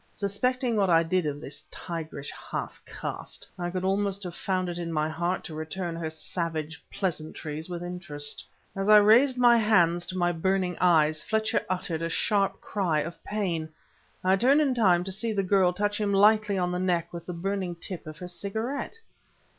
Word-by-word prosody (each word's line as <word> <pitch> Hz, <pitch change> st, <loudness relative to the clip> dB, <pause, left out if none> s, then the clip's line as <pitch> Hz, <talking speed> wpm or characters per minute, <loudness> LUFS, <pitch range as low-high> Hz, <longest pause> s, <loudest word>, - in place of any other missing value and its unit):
Suspecting 240 Hz, +5 st, -1 dB
what 195 Hz, -2 st, +3 dB
I 165 Hz, -1 st, +5 dB
did 175 Hz, 0 st, 0 dB
of 145 Hz, 0 st, -3 dB
this 145 Hz, -1 st, -6 dB
tigerish 160 Hz, -5 st, -6 dB
half -, -, -6 dB
caste, -, -, -6 dB
I 175 Hz, 0 st, -2 dB
could 185 Hz, +1 st, -3 dB
almost 200 Hz, +1 st, 0 dB
have 180 Hz, -2 st, -5 dB
found 185 Hz, 0 st, -1 dB
it 175 Hz, 0 st, -4 dB
in 170 Hz, -1 st, -3 dB
my 155 Hz, -1 st, +1 dB
heart 170 Hz, +3 st, -2 dB
to 160 Hz, -, -8 dB
return 160 Hz, +3 st, -4 dB
her 165 Hz, -1 st, -3 dB
savage 160 Hz, -1 st, -4 dB
pleasantries 155 Hz, -2 st, -3 dB
with 175 Hz, -1 st, -4 dB
interest. 165 Hz, -5 st, -6 dB, 0.3 s
As 195 Hz, +1 st, -1 dB
I 215 Hz, -, +10 dB
raised 235 Hz, +6 st, +6 dB
my 240 Hz, -1 st, +6 dB
hands 175 Hz, -6 st, +3 dB
to 185 Hz, -, -4 dB
my 175 Hz, -1 st, +2 dB
burning 180 Hz, +1 st, 0 dB
eyes, 155 Hz, -3 st, +4 dB
Fletcher 220 Hz, 0 st, 0 dB
uttered 175 Hz, -3 st, -2 dB
a 165 Hz, -, -1 dB
sharp 200 Hz, +3 st, +1 dB
cry 175 Hz, -7 st, 0 dB
of 170 Hz, +2 st, -7 dB
pain. 175 Hz, -7 st, -2 dB, 0.5 s
I 190 Hz, +1 st, +4 dB
turned 265 Hz, +8 st, +4 dB
in 285 Hz, -4 st, +3 dB
time 185 Hz, -7 st, +4 dB
to 190 Hz, -, -5 dB
see 220 Hz, +4 st, -1 dB
the 200 Hz, -2 st, +1 dB
girl 185 Hz, -1 st, +4 dB
touch 205 Hz, +3 st, -1 dB
him 205 Hz, -1 st, +1 dB
lightly 210 Hz, 0 st, +4 dB
on 180 Hz, -1 st, 0 dB
the 180 Hz, -, -1 dB
neck 175 Hz, -2 st, 0 dB
with 170 Hz, -1 st, -7 dB
the 180 Hz, -, -4 dB
burning 185 Hz, 0 st, -2 dB
tip 170 Hz, 0 st, -7 dB
of 155 Hz, 0 st, -8 dB
her 180 Hz, -, -7 dB
cigarette. 220 Hz, -, -4 dB
180 Hz, 190 wpm, -27 LUFS, 165-200 Hz, 0.5 s, I